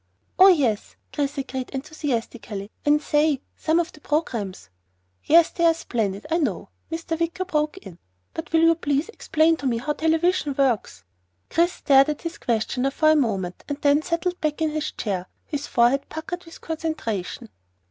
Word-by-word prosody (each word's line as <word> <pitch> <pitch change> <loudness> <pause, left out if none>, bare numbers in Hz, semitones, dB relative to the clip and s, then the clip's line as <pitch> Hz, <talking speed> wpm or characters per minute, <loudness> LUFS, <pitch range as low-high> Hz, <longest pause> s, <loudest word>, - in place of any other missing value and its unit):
"Oh 380 - +10
yes!" 270 - +2 0.2
Chris 285 -1 -1
agreed 260 -1 -4
enthusiastically, 240 -7 -4
"And 295 0 +4
say! 295 -2 +2 0.2
Some 320 +1 +1
of 345 +1 -1
the 305 - -17
programs 230 - -2 0.2
" 90 0 -43
"Yes, 330 +1 +6
they 340 - -2
are 330 -1 +5
splendid, 210 -10 -2
I 330 - +3
know," 305 - -2 0.2
Mr. 325 0 -3
Wicker 335 +2 -1
broke 305 -1 -1
in. 180 - -11 0.3
"But 325 - -6
will 325 0 +4
you 330 0 +6
please 295 +2 -1
explain 325 -7 +2
to 280 - -3
me 235 -2 +1
how 295 +6 -2
television 320 -1 +1
works?" 255 - 0 0.5
Chris 345 +2 +3
stared 275 0 +4
at 300 - -3
his 335 0 -5
questioner 245 +3 0
for 310 +3 +3
a - - +5
moment 195 - -1
and 285 0 -3
then 290 +1 +4
settled 350 +2 -2
back 305 0 -1
in 315 -1 +1
his 310 0 -2
chair, 185 -4 -3 0.2
his 290 -2 -4
forehead 245 +3 +2
puckered 350 +3 -6
with 330 - -13
concentration. 300 - -4
295 Hz, 175 wpm, -24 LUFS, 245-325 Hz, 0.5 s, Oh